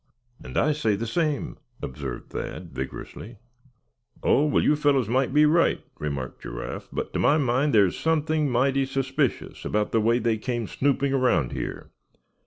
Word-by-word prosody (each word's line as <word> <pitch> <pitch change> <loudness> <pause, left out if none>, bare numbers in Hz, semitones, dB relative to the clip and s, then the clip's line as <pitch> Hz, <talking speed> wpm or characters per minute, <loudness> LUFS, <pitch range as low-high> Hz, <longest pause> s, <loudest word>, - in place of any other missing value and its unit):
"And - - -6
I 155 - +3
say 115 -9 +1
the 110 +4 -3
same," 150 +3 -1 0.3
observed 65 -2 -6
Thad, - - -6
vigorously. 65 - -7 0.9
"Oh! 145 - +4
well, 145 - +2
you 150 - +4
fellows 145 -5 +2
may 130 +3 +2
be 150 +3 +4
right," 165 +3 +3 0.2
remarked 70 -4 -4
Giraffe; - - -6
"but - - -4
to - - -1
my 150 - +4
mind 135 +1 +1
there's 100 -5 +3
something 155 -2 +1
mighty 135 +2 +2
suspicious 135 -1 -1
about 105 0 -1
the 115 - +2
way 115 +2 +3
they 115 -3 0
came 120 -1 -2
snooping 140 +3 0
around 125 - +2
here. - - -5
130 Hz, 160 wpm, -25 LUFS, 110-145 Hz, 0.9 s, Oh